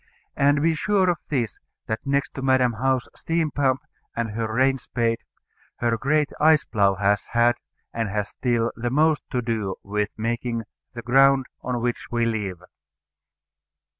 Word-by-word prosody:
And 145 +1 +3
be 165 0 +3
sure 185 +3 +2
of 170 - -4
this, 120 -9 -2 0.3
that 110 0 -2
next 140 0 0
to 135 - -6
Madam 130 -2 +3
How's 130 +2 0
steam 165 -2 -1
pump 135 -2 +1 0.3
and 115 -2 -2
her 110 0 -3
rain 135 +3 +2
spade, 115 -2 -1 0.6
her 120 -1 0
great 145 +5 +1
ice 155 0 +5
plough 100 -3 +2
has 100 +1 +1
had, 120 +1 +4 0.4
and 115 -2 -1
has 105 0 -2
still, 120 -2 0
the 120 +1 -2
most 155 +3 +3
to 125 -1 -1
do 110 -5 -2
with 105 +1 -1
making 115 +1 -2 0.3
the 120 - -6
ground 135 +2 +5 0.2
on 125 -1 -2
which 120 0 -2
we 120 -1 +1
live. 100 -6 -3
120 Hz, 160 wpm, -24 LUFS, 115-135 Hz, 0.6 s, ice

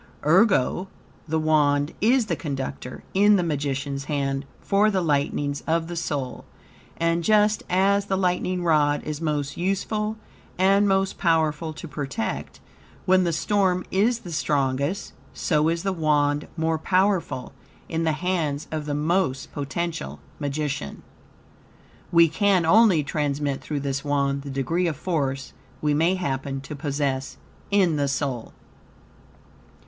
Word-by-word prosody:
Ergo, 185 - +3 0.4
the 160 +1 0
Wand 150 -1 +2
is 240 +3 +4
the - - -1
conductor, 135 -4 -5
in 205 +2 +5
the 185 - +2
magician's 140 -3 -2
hand, 140 -2 -2
for 205 +2 +3
the 195 -3 +1
lightnings 145 -3 0
of 165 0 +1
the 175 +1 -6
soul; 140 -6 -3 0.5
and 170 0 +1
just 210 +2 +3
as 200 +2 +3
the 190 - 0
lightning 180 -1 0
rod 150 -3 +2
is 150 0 -5
most 150 -2 -2
useful 210 +4 -1 0.4
and 195 +2 +4
most 195 0 +1
powerful 160 -2 +1
to - - -8
protect, 150 +10 -4 0.5
when 185 -1 +4
the 170 - +1
storm 185 +1 +1
is 225 +5 +2
the 175 - -8
strongest; 145 +2 -1 0.2
so 155 -1 +1
is 165 0 -1
the 195 -1 0
Wand 150 -3 +1
most 160 -1 0
powerful 185 -9 0 0.3
in 165 0 -2
the 160 - +2
hands 155 -4 -1
of 155 -1 -3
the 145 - -1
most 150 -3 0
potential 140 - -4 0.2
magician. 145 - -3 1.1
We 170 0 +6
can 185 +1 +2
only 195 -3 +5
transmit 145 -1 -1
through 145 -2 -3
this 135 -1 -2
Wand 140 -1 0
the 140 - -8
degree 165 +7 0
of 160 - -1
force 135 -7 -2 0.3
we 150 -1 +1
may 165 +5 +2
happen 135 -6 -3
to 150 +2 -7
possess 140 -2 -2 0.3
in 185 -6 +3
the 140 -1 +1
soul. 135 -4 -3
155 Hz, 140 wpm, -24 LUFS, 145-185 Hz, 1.1 s, We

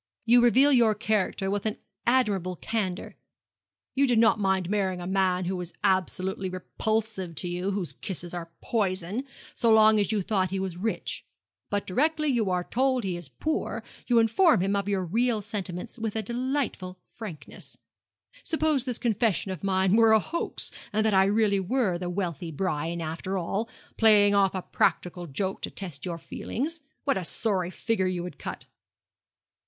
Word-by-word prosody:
You 240 +1 +6
reveal 260 +4 +6
your 230 -4 +4
character 205 -2 0
with 205 +1 -1
an 215 - -2 0.3
admirable 205 -8 +2
candour. 190 -1 -3 0.8
You 275 +1 +3
did 245 -2 +2
not 225 -1 +5
mind 190 -3 +1
marrying 190 -2 0
a 175 - -6
man 185 -1 +1
who 185 +2 -1
was 180 -1 -6
absolutely 190 +1 0
repulsive 190 0 -2
to 180 - -1
you 180 +2 -2
whose 195 -4 -2
kisses 175 -2 -6
are 170 -1 -5
poison 200 +2 -1 0.3
so 235 - +1
long 220 0 +6
as 205 - +1
you 210 -3 0
thought 190 -2 +1
he 195 - -2
was 190 -2 -3
rich. 215 +6 -3 0.5
But 205 0 -1
directly 305 +9 +1
you 230 -7 +1
are 180 -1 0
told 260 +3 +1
he 185 -3 -2
is 175 -5 -7
poor 305 - -3 0.2
you 240 - +3
inform 230 - +4
him 195 +2 +1
of 200 0 -1
your 190 -2 0
real 230 +5 +1
sentiments 195 +3 -5
with 220 -1 -3
a 220 - -1
delightful 240 -5 -2
frankness. 205 -10 -10 0.6
Suppose 310 -5 +1
this 250 -3 -1
confession 220 -4 0
of 185 -2 -6
mine 190 0 +2
were 225 -1 +6
a 220 - +6
hoax, 340 - -3 0.2
and 215 +1 +1
that 220 - +3
I 190 0 +5
really 205 0 +2
were 190 -2 0
the 180 0 -3
wealthy 175 -3 -3
Brian 165 0 -2
after 165 +4 -3
all 195 +5 -2 0.3
playing 210 -2 +6
off 195 -1 +3
a 185 - -3
practical 175 0 0
joke 190 +7 -3
to - - -3
test 170 -8 -7
your 170 -2 -3
feelings 295 - -4 0.2
what 275 -8 +1
a - - -5
sorry 185 -1 0
figure 190 0 -1
you 180 -1 -2
would 175 -5 -8
cut!' - - -6
195 Hz, 175 wpm, -27 LUFS, 180-225 Hz, 0.8 s, You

